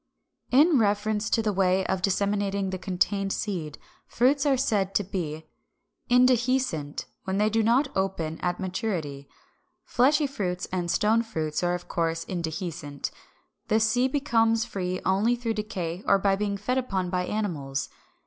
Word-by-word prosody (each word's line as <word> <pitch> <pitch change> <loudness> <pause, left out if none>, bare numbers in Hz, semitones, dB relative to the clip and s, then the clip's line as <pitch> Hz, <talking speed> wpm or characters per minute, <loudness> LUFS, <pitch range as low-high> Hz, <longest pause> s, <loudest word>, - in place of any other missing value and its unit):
In 290 +3 +5
reference 210 0 +1
to 225 - +2
the 210 -1 0
way 190 0 +2
of 190 - -1
disseminating 200 0 0
the 185 - -4
contained 195 +1 0
seed, 170 -10 -3 0.3
fruits 275 +4 +2
are 270 -2 +3
said 205 -7 0
to 205 - +3
be 160 -5 -4 0.6
Indehiscent 250 - +2 0.2
when 190 0 -1
they 210 +1 +2
do 225 +1 +2
not 250 +5 +2
open 180 -5 -2
at 180 -1 -2
maturity. 180 -8 -3 0.6
Fleshy 290 +5 +3
fruits 190 -10 -3
and 180 -2 -2
stone 220 +5 +3
fruits 160 -10 -3
are 175 0 +1
of 175 - -8
course 165 -1 -1
indehiscent. 160 -4 -4 0.6
The 220 - +3
seed 245 +4 +2
becomes 225 -5 +2
free 185 -1 -3
only 200 +6 +2
through 235 -2 -2
decay 190 -5 -4
or 200 - +6
by 195 0 +2
being 200 0 -2
fed 250 +6 0
upon 190 -8 -2
by 180 -1 0
animals. 145 - -2
200 Hz, 150 wpm, -26 LUFS, 180-225 Hz, 0.6 s, or